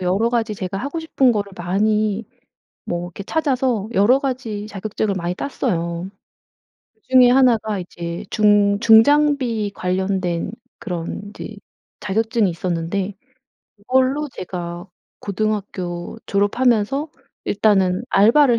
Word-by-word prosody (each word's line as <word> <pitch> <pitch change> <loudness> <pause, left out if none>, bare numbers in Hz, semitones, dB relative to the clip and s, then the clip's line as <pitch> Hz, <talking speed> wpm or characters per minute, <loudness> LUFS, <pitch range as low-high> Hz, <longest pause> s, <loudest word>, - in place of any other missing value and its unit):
여러가지 220 +5 0
제가 190 -1 -4
하고 285 +8 -4
싶은 270 -6 +2
거를 205 -2 -2
많이 210 +4 0 0.6
뭐 175 0 -3
이렇게 190 +3 -9
찾아서 255 -7 0
여러가지 230 -1 +1
자격증을 205 0 -3
많이 175 -1 -2
땄어요. 175 -9 -2 0.9
그 440 - -39
중에 255 -1 +6
1 255 -2 +5
가 215 -1 -3
이제 175 +1 -6
중 205 -1 +3
중장비 240 -2 +4
관련된 185 -1 -1 0.3
그런 175 -1 -4
이제 215 0 -9 0.4
자격증이 220 0 +1
있었는데 175 +3 -2 0.6
이걸로 260 +7 +1
제가 175 0 -6 0.3
고등학교 200 -2 -3
졸업하면서 235 +7 +1 0.4
일단은 195 -1 +2
알바를 235 +4 +5
210 Hz, 255 characters per minute, -20 LUFS, 185-240 Hz, 0.9 s, 중에